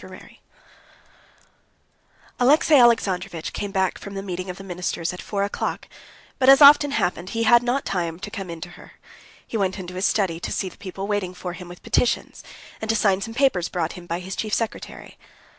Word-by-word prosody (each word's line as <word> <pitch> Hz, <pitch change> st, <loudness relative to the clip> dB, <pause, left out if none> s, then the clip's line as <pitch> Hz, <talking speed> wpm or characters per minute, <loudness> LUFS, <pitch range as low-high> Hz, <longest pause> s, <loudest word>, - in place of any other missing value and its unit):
Chapter -, -, -10 dB
33 -, -, -17 dB, 2.0 s
Alexey 295 Hz, +5 st, +4 dB
Alexandrovitch 195 Hz, -, +3 dB
came 205 Hz, -, -4 dB
back 190 Hz, -2 st, -1 dB
from 200 Hz, 0 st, -9 dB
the 195 Hz, -, -4 dB
meeting 185 Hz, -1 st, -5 dB
of 180 Hz, -, -6 dB
the 195 Hz, -, -10 dB
ministers 180 Hz, -1 st, -3 dB
at 180 Hz, -, -8 dB
four 200 Hz, -1 st, -2 dB
o'clock, 200 Hz, -, -3 dB, 0.5 s
but 260 Hz, 0 st, +5 dB
as 275 Hz, -, +9 dB
often 290 Hz, 0 st, +8 dB
happened, 185 Hz, -9 st, -1 dB
he 230 Hz, +2 st, -1 dB
had 235 Hz, +2 st, +6 dB
not 245 Hz, +3 st, -1 dB
time 170 Hz, -3 st, -2 dB
to 210 Hz, -, -6 dB
come 195 Hz, -4 st, -6 dB
in 165 Hz, -1 st, -7 dB
to 175 Hz, -, -7 dB
her. -, -, -15 dB, 0.5 s
He 225 Hz, -, -4 dB
went 190 Hz, -2 st, 0 dB
into 180 Hz, -2 st, -7 dB
his 185 Hz, +2 st, -1 dB
study 185 Hz, -6 st, 0 dB
to -, -, -5 dB
see 190 Hz, -, -2 dB
the -, -, -18 dB
people 195 Hz, 0 st, -6 dB
waiting 200 Hz, -3 st, -2 dB
for 180 Hz, -1 st, -6 dB
him 180 Hz, -1 st, -10 dB
with 175 Hz, -, -12 dB
petitions, 235 Hz, +1 st, 0 dB, 0.4 s
and 220 Hz, -, -5 dB
to 225 Hz, -, +3 dB
sign 195 Hz, -3 st, +2 dB
some 225 Hz, +2 st, -6 dB
papers 255 Hz, -10 st, +2 dB
brought 170 Hz, -2 st, -2 dB
him 175 Hz, -1 st, -11 dB
by 170 Hz, +1 st, -3 dB
his 190 Hz, +1 st, -6 dB
chief 215 Hz, -1 st, -1 dB
secretary. 230 Hz, -1 st, -5 dB
195 Hz, 205 wpm, -23 LUFS, 180-225 Hz, 2.0 s, as